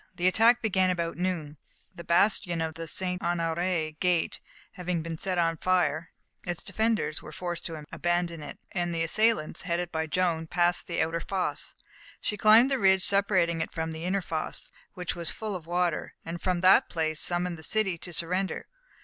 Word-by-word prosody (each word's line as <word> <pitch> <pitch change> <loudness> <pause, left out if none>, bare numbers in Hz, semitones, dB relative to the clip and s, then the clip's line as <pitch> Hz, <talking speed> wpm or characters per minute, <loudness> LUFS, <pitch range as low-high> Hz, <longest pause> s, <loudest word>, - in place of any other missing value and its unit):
The 175 -1 -2
attack 230 +5 +5
began 190 -4 +2
about 170 -2 -1
noon; 170 -5 -2 0.4
the 170 - -9
bastion 175 0 +2
of 160 -1 -2
the 165 +1 -6
St. 180 +2 -2
Honoré 165 -2 -1
gate 180 -3 +1 0.3
having 180 -2 -3
been 165 0 -4
set 185 +3 -2
on 165 -1 +2
fire, 175 -2 +1 0.3
its 175 -2 -1
defenders 220 -9 0
were - - -10
forced 175 -1 -4
to 160 -3 -7
abandon 175 -2 -1
it, 145 - -8
and 175 -1 -1
the 165 - 0
assailants, 215 -2 +1
headed 175 0 -2
by 160 0 -2
Joan, 165 -1 0
passed 175 +1 +1
the 170 - +1
outer 165 +1 -2
fosse. 190 +1 -2 0.4
She 210 - -2
climbed 220 +6 +6
the 270 - +1
ridge 190 -2 +4
separating 185 -4 +2
it - - -3
from 160 0 -3
the 160 +1 -6
inner 190 +1 0
fosse, 160 -2 -2 0.2
which 180 -1 -3
was 170 -2 -1
full 215 -3 -4
of 165 -3 -7
water, 175 -1 -1
and 165 +1 -5
from 180 -2 0
that 185 +1 +6
place 155 -2 -1
summoned 175 0 +1
the - - -10
city 190 0 +1
to 175 - -7
surrender. 180 +3 -2
175 Hz, 185 wpm, -28 LUFS, 165-185 Hz, 0.4 s, climbed